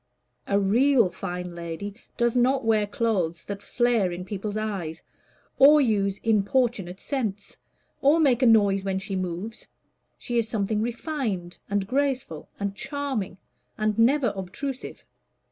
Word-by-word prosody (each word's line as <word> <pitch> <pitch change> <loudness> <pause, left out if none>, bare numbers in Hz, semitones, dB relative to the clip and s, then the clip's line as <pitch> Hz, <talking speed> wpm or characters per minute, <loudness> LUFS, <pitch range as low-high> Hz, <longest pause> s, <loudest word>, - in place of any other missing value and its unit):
"A 200 0 +2
real 230 +1 +4
fine 180 -1 -5
lady 170 +4 -6 0.2
does 235 0 +1
not 255 +1 +2
wear 215 -2 +3
clothes 195 -7 -1
that 200 -1 -6
flare 235 -7 +1
in 180 +1 -6
people's 205 +2 -4
eyes, 195 -7 -4 0.6
or 295 +3 +8
use 200 -7 +1
importunate 215 -3 +1
scents, 215 -8 -3 0.5
or 290 +4 +5
make 270 -5 +3
a 255 - +5
noise 200 -4 +4
as 190 0 -1
she 195 - -4
moves: 185 +5 -4 0.5
she 240 -1 -1
is 225 -1 -1
something 215 -1 0
refined 230 - -3
and 200 -1 0
graceful, 255 - -1
and 200 -1 -2
charming, 265 -8 -3 0.4
and 215 0 0
never 250 0 +3
obtrusive." 250 +8 -6
215 Hz, 135 wpm, -26 LUFS, 190-245 Hz, 0.6 s, or